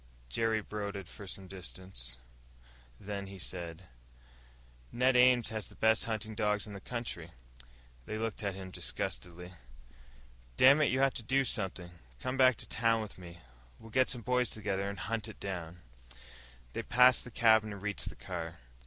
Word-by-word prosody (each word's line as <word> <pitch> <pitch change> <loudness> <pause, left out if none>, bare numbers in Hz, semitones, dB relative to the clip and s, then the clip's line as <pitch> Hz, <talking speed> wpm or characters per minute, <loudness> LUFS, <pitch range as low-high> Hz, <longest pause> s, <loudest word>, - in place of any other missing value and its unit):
Jerry 110 - +1
brooded 100 -3 -5
for 100 - -10
some 95 0 -7
distance, 90 -9 -7 0.8
then 100 -1 -5
he 95 0 -9
said, 85 -1 -4 1.1
"Ned 125 +1 +3
Ames 125 -2 +6
has 110 -2 -3
the - - -13
best 110 0 +3
hunting 110 -1 -3
dogs 105 -1 +1
in 105 - -8
the 100 - -6
country." 115 -9 -5 0.8
They 110 - -3
looked 110 -1 -3
at 100 -2 -2
him 95 -1 -7
disgustedly. 90 0 -4 1.0
"Dammit, 140 +3 +7
you 130 +2 +2
have 135 -1 +4
to - - -4
do 135 +4 +3
something! 95 -7 -2 0.3
Come 130 - -2
back 130 -2 +6
to - - -6
town 115 -1 +2
with 100 -3 -10
me. 85 -1 -11 0.4
We'll 115 - -13
get 130 +2 +4
some 120 - -1
of - - -18
the 125 - -3
boys 125 -1 +3
together, 100 -2 -2
and 100 - -6
hunt 115 +1 -2
it 110 - -10
down." 90 -3 -5 0.9
They - - -3
had - - -6
passed 125 +1 +6
the - - -9
cabin 110 -2 +4
and 100 - -6
reached 105 -1 -2
the - - -10
car. 85 -2 -5
105 Hz, 175 wpm, -33 LUFS, 95-115 Hz, 1.1 s, Dammit